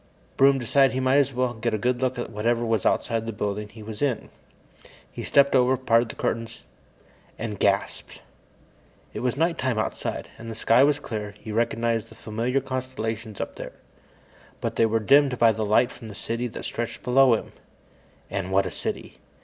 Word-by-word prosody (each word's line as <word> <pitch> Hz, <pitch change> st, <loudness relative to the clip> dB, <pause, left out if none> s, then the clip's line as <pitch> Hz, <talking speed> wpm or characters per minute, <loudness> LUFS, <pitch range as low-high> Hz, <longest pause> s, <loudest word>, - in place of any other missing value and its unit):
Broom 135 Hz, 0 st, +5 dB
decided 135 Hz, +2 st, +3 dB
he -, -, 0 dB
might 130 Hz, +1 st, +3 dB
as 140 Hz, -1 st, +2 dB
well 125 Hz, -1 st, 0 dB
get 115 Hz, -1 st, -1 dB
a -, -, 0 dB
good 125 Hz, +3 st, 0 dB
look 130 Hz, 0 st, 0 dB
at 120 Hz, -, -4 dB
whatever 115 Hz, +2 st, 0 dB
was 115 Hz, -3 st, +1 dB
outside 115 Hz, -1 st, 0 dB
the -, -, -2 dB
building 105 Hz, 0 st, -3 dB
he 110 Hz, +1 st, -12 dB
was 110 Hz, 0 st, -8 dB
in. 135 Hz, -6 st, -1 dB, 0.8 s
He -, -, -7 dB
stepped 140 Hz, 0 st, +4 dB
over, 130 Hz, 0 st, +4 dB
parted 115 Hz, -2 st, +2 dB
the -, -, -7 dB
curtains, 115 Hz, 0 st, -3 dB, 0.7 s
and 115 Hz, 0 st, -4 dB
And 105 Hz, -, -8 dB
gasped! -, -, 0 dB, 0.9 s
It -, -, -4 dB
was 125 Hz, +1 st, -1 dB
night 165 Hz, +2 st, +1 dB
time 130 Hz, -3 st, 0 dB
outside, 110 Hz, -, -3 dB
and 115 Hz, 0 st, -8 dB
the 115 Hz, -, -6 dB
sky 115 Hz, +3 st, +4 dB
was 145 Hz, 0 st, +3 dB
clear. 105 Hz, -6 st, -5 dB
He 110 Hz, -, -8 dB
recognized 115 Hz, 0 st, 0 dB
the 115 Hz, -, -14 dB
familiar 115 Hz, +5 st, -1 dB
constellations 115 Hz, -5 st, -4 dB
up -, -, -5 dB
there. -, -, -7 dB, 0.9 s
But -, -, -3 dB
they 115 Hz, -, +4 dB
were 115 Hz, +1 st, +1 dB
dimmed 135 Hz, +3 st, +4 dB
by 115 Hz, -1 st, +5 dB
the 110 Hz, 0 st, -2 dB
light 120 Hz, +4 st, +3 dB
from 115 Hz, -, -11 dB
the 105 Hz, -, -9 dB
city 115 Hz, +4 st, -3 dB
that 115 Hz, -, -8 dB
stretched 120 Hz, 0 st, -4 dB
below 130 Hz, -1 st, +5 dB
him. -, -, -6 dB, 0.8 s
And 100 Hz, -1 st, -4 dB
what 95 Hz, +1 st, +3 dB
a -, -, -3 dB
city! -, -, -5 dB
115 Hz, 195 wpm, -25 LUFS, 110-130 Hz, 0.9 s, Broom